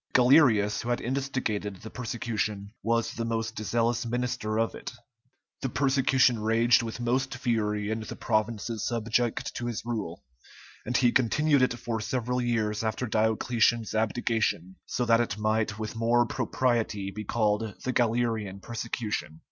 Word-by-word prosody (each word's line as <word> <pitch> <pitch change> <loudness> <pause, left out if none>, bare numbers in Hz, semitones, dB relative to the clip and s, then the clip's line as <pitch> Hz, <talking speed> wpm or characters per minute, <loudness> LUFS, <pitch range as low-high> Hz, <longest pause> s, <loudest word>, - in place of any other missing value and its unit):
Galerius, 125 -6 +5
who 120 - -5
had 120 - +1
instigated 125 -6 -2
the 110 +4 -10
persecution, 110 -4 -3
was 115 0 0
the 115 - -3
most 115 -1 -2
zealous 115 +2 +1
minister 120 -2 -2
of 115 - 0
it; - - -7 0.7
the 135 - -1
persecution 130 -3 +3
raged 115 +2 +4
with 115 0 -5
most 130 +3 0
fury 105 -4 -1
in 110 - -1
the 110 - -7
provinces 110 0 -1
subject 115 0 -1
to 120 - -4
his 115 -1 -4
rule, 105 -8 -4 0.6
and 125 +1 +2
he 120 -2 +4
continued 140 +4 +3
it 125 -1 +2
for 115 -2 -3
several 125 +2 -1
years 110 -3 0
after 110 +3 -1
Diocletian's 110 +1 +1
abdication, 110 -4 0
so 125 - -1
that 115 0 +4
it 105 -4 -2
might 110 0 0
with 110 0 -5
more 120 +1 +3
propriety 115 -6 -1
be 105 +2 -6
called 105 0 0
the 130 - -1
Galerian 115 -5 0
persecution. 110 -6 -4
115 Hz, 150 wpm, -28 LUFS, 110-120 Hz, 0.7 s, Galerius